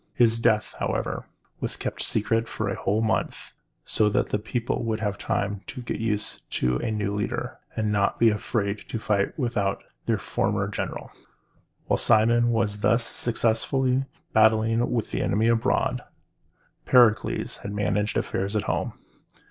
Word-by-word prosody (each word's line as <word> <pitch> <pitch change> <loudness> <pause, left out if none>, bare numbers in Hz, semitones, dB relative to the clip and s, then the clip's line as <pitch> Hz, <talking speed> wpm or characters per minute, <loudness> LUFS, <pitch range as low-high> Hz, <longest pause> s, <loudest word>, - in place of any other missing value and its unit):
His 115 -1 +4
death, 110 -2 +2
however, - - -2 0.3
was - - -1
kept - - -4
secret 115 +2 0
for 110 - -3
a 95 - -1
whole 105 +3 0
month, 110 0 -1 0.3
so 105 -1 +2
that - - 0
the 105 - 0
people 120 +3 -2
would 110 -1 -1
have 105 -2 -1
time 100 0 -2
to 125 - -7
get - - -4
used 105 -2 -1
to 60 0 +1
a 110 - -2
new 105 -2 -1
leader, 105 0 -3 0.2
and 110 -1 0
not 100 -1 +1
be 115 -1 +5
afraid 105 -1 -1
to - - -2
fight 105 -2 0
without 115 -8 -1 0.2
their - - +2
former - - -1
general. - - -5 0.7
While - - +1
Cimon 115 +2 +4
was 110 -3 0
thus 115 +3 +2
successfully 125 +4 +1 0.3
battling 110 +2 +4
with 115 -3 -1
the - - -1
enemy 110 +3 +1
abroad, 115 -1 +1 0.9
Pericles 120 -4 +3
had 100 - -7
managed 105 +1 0
affairs 100 +2 -2
at 105 - +1
home. - - -1
110 Hz, 155 wpm, -25 LUFS, 105-115 Hz, 0.9 s, be